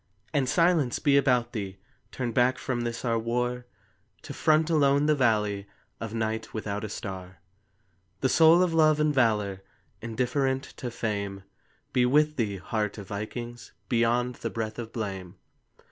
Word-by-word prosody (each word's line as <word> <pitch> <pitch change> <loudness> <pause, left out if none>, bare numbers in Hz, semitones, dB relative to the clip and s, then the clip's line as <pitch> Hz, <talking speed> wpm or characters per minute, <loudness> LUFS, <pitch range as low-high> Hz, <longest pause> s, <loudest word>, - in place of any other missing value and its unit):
And 135 -4 +1
silence 165 -7 +3
be 140 -1 +3
about 125 -4 +3
thee, 100 -4 -4 0.3
Turned 120 -3 -3
back 125 +2 +3
from 125 -2 -2
this 120 +1 -4
our 115 -1 +1
war 125 +2 -2 0.6
To - - -7
front 155 0 +3
alone 145 -2 +4
the 155 - +4
valley 105 -7 +1 0.3
Of 115 -2 -5
night 110 0 -3
without 105 -1 -3
a 110 - -4
star. 95 -4 -7 0.8
The 130 - +3
soul 165 +4 +6
of 175 -2 0
love 155 -2 +4
and 150 0 +2
valor, 105 -7 +1 0.4
Indifferent 130 +3 0
to 125 - -4
fame, 100 -4 -3 0.5
Be 125 -1 +3
with 150 +3 +3
thee, 105 -5 -1
heart 105 +2 -2
of 100 -2 -9
vikings, 120 +3 -6 0.2
Beyond 120 +1 +1
the - - -3
breath 110 -1 -4
of 115 -1 -6
blame. 95 -4 -5
120 Hz, 155 wpm, -27 LUFS, 110-135 Hz, 0.8 s, soul